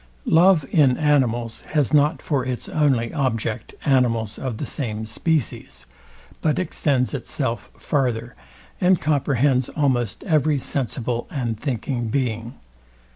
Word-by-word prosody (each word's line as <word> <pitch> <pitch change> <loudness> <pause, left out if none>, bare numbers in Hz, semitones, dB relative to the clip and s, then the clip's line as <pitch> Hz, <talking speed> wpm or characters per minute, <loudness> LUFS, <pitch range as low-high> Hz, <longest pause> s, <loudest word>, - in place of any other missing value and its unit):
Love 170 -2 +5
in 135 -6 +4
animals, 120 -6 +1
has 150 -1 +2
not 150 +1 +3
for 140 -5 0
its 125 -1 -4
only 135 -7 +1
object 115 -6 -2
animals 115 -5 +1
of 130 -5 -4
the - - -4
same 110 -6 -4
species, 145 +5 -2 0.6
but 155 -2 +1
extends 145 -7 0
itself 120 -5 -3
farther, 125 -4 -1 0.5
and 180 -1 +4
comprehends 140 -3 +1
almost 125 -7 0
every 155 -5 +2
sensible 125 -2 -2
and 120 -9 -3
thinking 125 -2 -2
being. 115 -1 -2
130 Hz, 120 wpm, -22 LUFS, 115-150 Hz, 0.6 s, Love